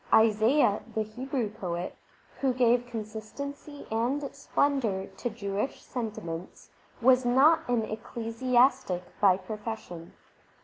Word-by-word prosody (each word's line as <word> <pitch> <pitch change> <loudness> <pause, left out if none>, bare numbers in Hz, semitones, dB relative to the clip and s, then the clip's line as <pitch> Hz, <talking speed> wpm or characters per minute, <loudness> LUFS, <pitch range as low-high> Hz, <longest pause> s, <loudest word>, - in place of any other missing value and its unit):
Isaiah, 220 +1 +4
the 220 - +1
Hebrew 245 +1 -3
poet, 180 -4 -4 0.4
who 265 -2 +1
gave 245 -1 +3
consistency 240 +6 -7
and 255 +6 0
splendour 270 -8 0
to 240 - -3
Jewish 210 +2 -3
sentiments, 190 -8 -6 0.3
was 255 +1 +6
not 265 +5 +4
an 240 -2 +2
ecclesiastic 235 -1 +1 0.2
by 190 -3 +6
profession. 210 -4 -7
230 Hz, 100 wpm, -29 LUFS, 210-260 Hz, 0.4 s, was